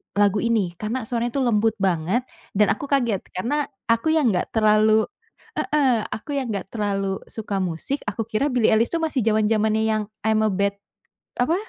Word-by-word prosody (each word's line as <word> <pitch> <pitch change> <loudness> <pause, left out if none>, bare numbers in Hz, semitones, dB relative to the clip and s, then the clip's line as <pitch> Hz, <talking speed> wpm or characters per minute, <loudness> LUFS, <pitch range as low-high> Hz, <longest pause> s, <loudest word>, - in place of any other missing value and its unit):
lagu 205 0 +3
ini 220 -7 +1
karena 225 +3 -2
suaranya 235 +1 -2
itu 275 - +1
lembut 225 -2 +2
banget 185 +5 +1 0.3
dan 205 0 +4
aku 250 - -6
kaget 240 -8 +2 0.2
karena 285 +9 0 0.2
aku 230 +7 +2
yang 280 -8 +3
enggak 180 - 0
terlalu 215 0 +4 0.6
heeh, 260 -7 +2
aku 220 - -6
yang 260 - -3
enggak 195 -1 -4
terlalu 195 -3 -1
suka 210 -3 -4
musik 185 - -2
aku 225 - -2
kira 225 +6 -1
Billie 240 -3 +3
Eilish 225 +5 +2
tuh 330 - 0
masih 300 -5 0
zaman-zamannya 220 0 +2
yang 220 -1 +1 0.2
"I'm 220 0 +2
a 215 - +3
Bad," 200 +1 0 0.6
apa, 250 +7 +2
220 Hz, 175 wpm, -23 LUFS, 205-240 Hz, 0.6 s, dan